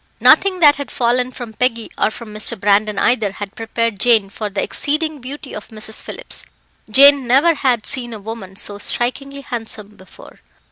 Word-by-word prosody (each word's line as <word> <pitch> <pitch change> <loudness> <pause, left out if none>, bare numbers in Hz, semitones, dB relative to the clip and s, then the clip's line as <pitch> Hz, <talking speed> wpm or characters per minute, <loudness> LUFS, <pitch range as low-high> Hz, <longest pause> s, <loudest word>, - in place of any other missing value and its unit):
Nothing 375 -2 +5
that 290 -2 +7
had 285 -1 -6
fallen 250 +1 0
from 245 -3 -9
Peggy, 230 0 -1
or - - +1
from 220 -1 -10
Mr. 215 +1 -2
Brandon 205 +1 +2
either, 220 -5 +1
had 200 0 -7
prepared 225 -2 -2
Jane 220 -4 +3
for 210 0 -4
the 195 0 -2
exceeding 305 0 -2
beauty 275 +3 -8
of 210 - -8
Mrs. 220 0 -4
Phillips. - - -6 0.5
Jane 275 +2 +6
never 280 +8 +4
had 255 -7 0
seen 240 -2 -2
a 220 - -7
woman 205 -2 -8
so 205 +1 -4
strikingly 275 +6 -2
handsome 225 -5 -6
before. 190 -3 -16
235 Hz, 175 wpm, -18 LUFS, 215-275 Hz, 0.5 s, that